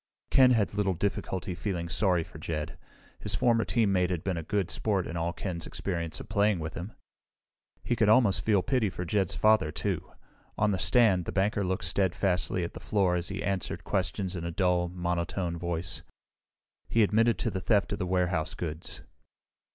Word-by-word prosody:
Ken 130 -1 +7
had 110 -6 +2
little 100 -2 0
difficulty 95 0 -2
feeling 85 -1 -3
sorry 90 0 +1
for - - -12
Jed. 80 +1 -4 0.4
His 105 -1 -3
former 115 +1 +3
teammate 100 -6 +2
had 90 -3 -2
been 95 -2 -1
a 85 - -3
good 100 +2 -1
sport 100 -4 0
in 85 - -6
all 85 0 -1
Ken's 85 -2 -4
experience 85 -4 -3
of - - -9
playing 105 -1 +2
with 80 -1 -5
him. 90 +6 -6 0.9
He 120 - 0
could 110 -3 +3
almost 110 -3 +5
feel 100 -4 +3
pity 125 -1 +1
for 90 -1 -5
Jed's 95 0 0
father, 110 -7 +3
too. - - -3 0.5
On 105 0 +2
the 95 - -1
stand, 95 -1 +3
the - - -4
banker 100 +1 +1
looked 95 -1 -2
steadfastly 90 0 0
at 85 - -4
the - - -8
floor 90 +1 +1
as 85 0 0
he - - -4
answered 95 -1 -2
questions 95 0 -2
in 85 - -4
a 85 - -2
dull, 90 0 +1
monotone 85 0 -2
voice. 85 +1 -3 0.9
He 115 - +4
admitted 110 +2 +3
the 95 - -2
theft 105 -1 +2
of - - -4
the 90 - -2
warehouse 90 -3 0
goods. 80 -1 -6
95 Hz, 180 wpm, -29 LUFS, 85-105 Hz, 0.9 s, Ken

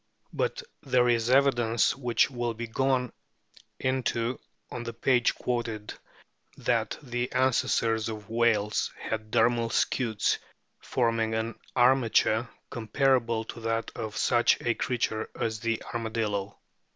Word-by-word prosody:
But 485 0 -1 0.2
there 125 -3 +2
is 120 -1 +2
evidence, 120 -4 +3
which 125 -1 +1
will 120 -2 -2
be 120 +1 -4
gone 125 +1 0 0.7
into 130 -2 -1 0.3
on 120 - -5
the 115 - -5
o - - -27
page 125 0 +2
quoted, 115 -4 -3 0.6
that - - 0
the 120 -1 -3
ancestors 115 -3 +1
of 105 -2 -7
whales 110 -2 +1
had 110 -1 -4
dermal 115 0 +2
scutes, 115 -4 +1 0.4
forming 115 -2 0
an 110 +1 -2 0.2
armature 120 -2 +3 0.2
comparable 115 0 +1
to 115 - -9
that 115 0 -2
of 110 -2 -5
such 120 -1 +3
a 120 - +1
creature 115 -3 -2
as 110 -1 -1
the 115 -1 -1
Armadillo. 110 -4 -2
115 Hz, 125 wpm, -28 LUFS, 110-125 Hz, 0.7 s, evidence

